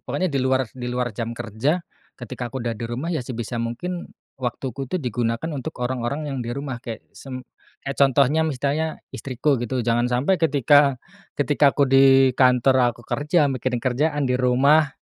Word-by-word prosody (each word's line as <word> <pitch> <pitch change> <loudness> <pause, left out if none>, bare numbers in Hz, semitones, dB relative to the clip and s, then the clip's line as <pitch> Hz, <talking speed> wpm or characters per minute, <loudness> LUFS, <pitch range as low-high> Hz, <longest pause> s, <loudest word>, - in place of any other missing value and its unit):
pokoknya 185 -5 -2
di 135 - +1
luar 130 0 +2
di 125 -1 -6
luar 125 -1 -2
jam 115 +2 -5
kerja, 120 - -1 0.3
ketika 120 0 -6
aku 120 0 -6
udah 115 - -1
di 115 +1 -6
rumah 140 +9 -3
ya 155 - -1
sebisa 120 -1 -4
mungkin, 170 +10 -4 0.3
waktuku 130 +1 -4
tuh 185 - -1
digunakan 120 0 -2
untuk 145 +3 -5
orang-orang 130 +4 -3
yang 135 - -3
di 120 - -5
rumah 135 -4 -5
kayak 115 -3 -7
sem 130 -2 -8 0.4
kek 135 - -2
contohnya 140 +3 +4
misalnya 155 +1 -1 0.2
istriku 135 0 -1
gitu. 120 0 -2
Jangan 120 +1 +1
sampai 135 +10 +1
ketika 145 -2 +4 0.4
ketika 145 0 +2
aku 140 - +4
di 135 -1 +5
kantor 125 -1 +3
aku 120 - -16
kerja 150 -1 +1
mikirin 130 0 -2
kerjaan, 145 +4 0
di 125 - 0
rumah 140 +4 +4
130 Hz, 170 wpm, -23 LUFS, 120-145 Hz, 0.4 s, di